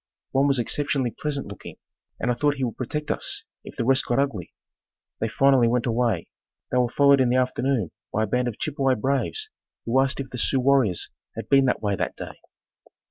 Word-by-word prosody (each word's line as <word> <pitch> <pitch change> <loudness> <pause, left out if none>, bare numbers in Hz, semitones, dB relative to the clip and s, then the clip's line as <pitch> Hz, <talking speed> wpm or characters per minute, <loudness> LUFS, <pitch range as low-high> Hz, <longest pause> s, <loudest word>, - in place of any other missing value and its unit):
One 135 +1 +3
was 140 -1 +3
exceptionally 130 +1 -1
pleasant 140 +4 -3
looking 100 -2 -10 0.4
and 125 - 0
I - - +2
thought 145 +4 +1
he 135 - -3
would 120 -3 -2
protect 150 +4 -3
us - - -1 0.2
if - - -11
the 115 - -2
rest 135 +1 +3
got 120 - +1
ugly. 135 - -1 0.7
They - - 0
finally 135 -3 +4
went 120 0 +1
away. 115 -6 0 0.4
They 125 - +2
were 125 -1 +2
followed 140 +1 +5
in 125 - +3
the 125 - +2
afternoon 130 -5 0 0.2
by 110 - +1
a - - +2
band 125 +4 0
of 115 - -4
Chippewa 135 -3 0
braves 140 - -1 0.3
who 130 +3 +3
asked 135 +1 0
if 135 -1 -5
the 125 - -5
Sioux 135 - +2
warriors 130 -8 +2 0.2
had 115 -1 -7
been 135 -1 +5
that 125 - 0
way 100 -1 +1
that - - -3
day. - - -8
130 Hz, 205 wpm, -24 LUFS, 120-140 Hz, 0.7 s, followed